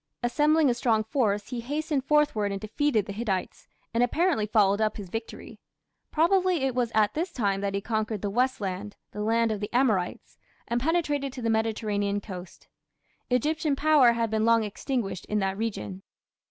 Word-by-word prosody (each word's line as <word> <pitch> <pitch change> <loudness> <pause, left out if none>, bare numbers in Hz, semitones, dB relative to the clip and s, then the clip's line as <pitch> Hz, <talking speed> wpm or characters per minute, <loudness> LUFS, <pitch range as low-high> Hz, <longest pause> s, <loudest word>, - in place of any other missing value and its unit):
Assembling 300 +5 +3
a 250 - +3
strong 230 -2 +1
force, 215 -4 0
he 245 -2 -4
hastened 295 +3 -1
northward 295 -9 +2
and 195 - -3
defeated 220 +1 0
the 200 - -6
Hittites, 200 -4 -3 0.3
and 230 - +2
apparently 265 - +2
followed 205 -1 +3
up 215 -1 0
his 200 -4 -7
victory. 225 0 -7 0.5
Probably 360 -1 +2
it 265 -1 +1
was 245 -2 0
at 215 -2 +3
this 345 +4 -2
time 200 -8 -1
that 200 0 -2
he 200 - -1
conquered 215 -1 -2
the 200 - -1
"West 255 +4 +1
Land" 200 +1 -4 0.2
(the 210 - -5
land 225 +1 +2
of 215 - -2
the 205 - -5
Amorites) 220 -8 0 0.3
and 240 +1 -1
penetrated 295 -3 0
to 255 - -7
the 230 - +1
Mediterranean 210 -2 0
coast. 185 -3 -10 0.6
Egyptian 295 +4 +1
power 290 -5 +5
had 230 -1 -1
been 220 0 +1
long 230 0 +4
extinguished 210 -2 -3
in 210 - -1
that 195 -1 0
region. 105 - -4
225 Hz, 180 wpm, -27 LUFS, 205-270 Hz, 0.6 s, power